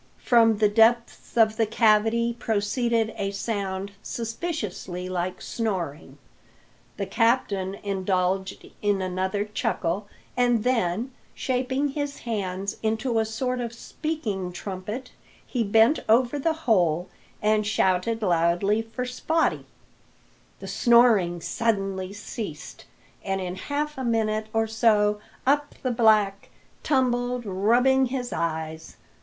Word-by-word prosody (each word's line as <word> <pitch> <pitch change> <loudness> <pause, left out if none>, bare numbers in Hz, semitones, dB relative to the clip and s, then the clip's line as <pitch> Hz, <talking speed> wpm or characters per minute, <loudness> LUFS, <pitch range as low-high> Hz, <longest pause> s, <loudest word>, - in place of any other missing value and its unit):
From 225 -3 +5
the 210 0 +4
depths 230 +3 +2
of 220 -1 +4
the 225 - +2
cavity 225 +1 +3
proceeded 225 +1 0
a 195 -1 -1
sound 200 -1 -3
suspiciously 225 - -4
like 185 0 -3
snoring. 180 -9 -3 0.8
The - - -2
captain 205 -5 +1
indulged 190 -1 -1 0.2
in 205 -1 +1
another 190 +2 -1
chuckle, 200 -2 -2 0.3
and 245 -3 +2
then, 235 -1 0 0.2
shaping 260 +2 -1
his 285 0 -4
hands 195 -4 -3
into 225 +2 0
a 220 - +1
sort 250 +3 -2
of 235 -1 -4
speaking 230 - -4
trumpet, 200 +7 -6 0.3
he 245 -3 -1
bent 225 +7 +4
over 245 +5 +3
the 325 +3 +1
hole 175 -6 +2 0.3
and 215 0 +2
shouted 215 +2 +1
loudly 175 +4 +2
for 225 +3 -5
Spottie. 320 +6 0 0.9
The - - -8
snoring 225 -8 +4
suddenly 195 -3 -1
ceased, 200 -5 -7 0.4
and 195 -1 -1
in 180 -1 -4
half 290 +8 -3
a - - -3
minute 220 -2 0
or 225 0 +1
so 215 -2 +2 0.3
up 290 +2 +1
the 255 - 0
black 215 -4 +3 0.3
tumbled, 250 -3 0
rubbing 240 +7 +3
his 245 -1 -4
eyes. 160 -1 -4
220 Hz, 115 wpm, -25 LUFS, 195-240 Hz, 0.9 s, From